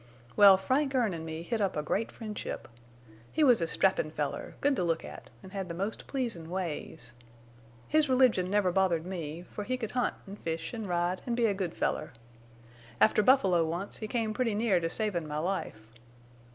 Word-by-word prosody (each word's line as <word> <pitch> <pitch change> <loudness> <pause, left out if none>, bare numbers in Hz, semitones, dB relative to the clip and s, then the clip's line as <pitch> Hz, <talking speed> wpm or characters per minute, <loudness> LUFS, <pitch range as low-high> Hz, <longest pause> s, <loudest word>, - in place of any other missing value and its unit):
Well, 200 -2 +9
Frank 270 +8 0
Erne 230 -7 +2
an 160 -1 -5
me 160 +1 -5
hit 220 +5 -2
up 195 -5 0
a 150 - -1
great 215 +8 -1
friendship. 215 -2 -6 0.6
He 315 - +2
was 250 -9 +6
a 165 - +1
strappin' 190 -2 +2
feller, 150 -2 -4
good 285 0 +2
to - - +1
look 165 -2 0
at, - - -10
an' 190 - -11
had 190 -2 -4
the 170 - -4
most 200 +5 -4
pleasin' 230 - -2
ways. 165 -9 -4 0.7
His 305 -1 +3
religion 250 -8 +4
never 200 -2 +2
bothered 175 -3 +2
me, 170 -3 -5
for 210 - -5
he 255 +4 -2
could 225 -4 -4
hunt 250 -1 0
an' 200 0 -9
fish 165 +1 -4
an' 225 -2 -4
ride 175 +1 0
an' 235 - 0
be 235 -1 +2
a 210 - +3
good 190 -4 -3
feller. - - -1 0.9
After 215 - +5
buffalo 195 -8 +4
once, 170 +5 -3
he 215 - -5
come 220 -1 -1
pretty 230 -2 0
near 210 -4 +2
to 165 -1 -1
savin' 180 -5 -2
my 150 0 -4
life. 155 - -3
190 Hz, 195 wpm, -30 LUFS, 170-225 Hz, 0.9 s, Well